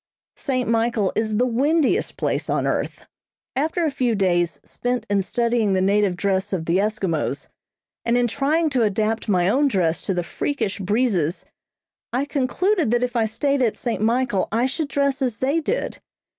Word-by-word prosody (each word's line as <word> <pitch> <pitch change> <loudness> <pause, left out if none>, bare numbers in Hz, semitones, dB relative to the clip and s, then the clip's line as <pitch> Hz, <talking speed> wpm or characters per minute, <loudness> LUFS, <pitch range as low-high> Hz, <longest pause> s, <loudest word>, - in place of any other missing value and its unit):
St. 255 -3 -1
Michael 225 -3 +1
is 215 -1 0
the 245 - +3
windiest 290 - +1
place - - -1
on - - +1
earth. - - -2 0.5
After 320 +5 0
a 305 - +1
few 255 -4 0
days 175 -3 +1
spent 245 -2 -2
in 200 -1 +3
studying 230 0 +1
the 190 - +2
native 200 0 +2
dress 190 +1 -1
of 165 -4 -2
the 170 +2 +2
Eskimos, 190 -9 -1 0.5
and 235 +1 +2
in 245 - +3
trying 300 +6 +1
to 255 -3 +1
adapt 220 +1 0
my 180 -3 +3
own 280 +8 +3
dress 175 -9 +1
to 190 - -2
the 175 - 0
freakish 210 - -2
breezes 195 -5 0 0.7
I 255 +4 0
concluded 305 - +1
that 240 +1 +2
if 250 0 -2
I 230 -2 +3
stayed 275 +6 0
at 230 -4 +1
St. 235 -5 -2
Michael 230 -3 +1
I 230 +3 +2
should 285 +4 -2
dress 280 -1 0
as 245 -4 0
they 275 +6 +1
did. 460 +10 -2
235 Hz, 175 wpm, -22 LUFS, 200-270 Hz, 0.7 s, the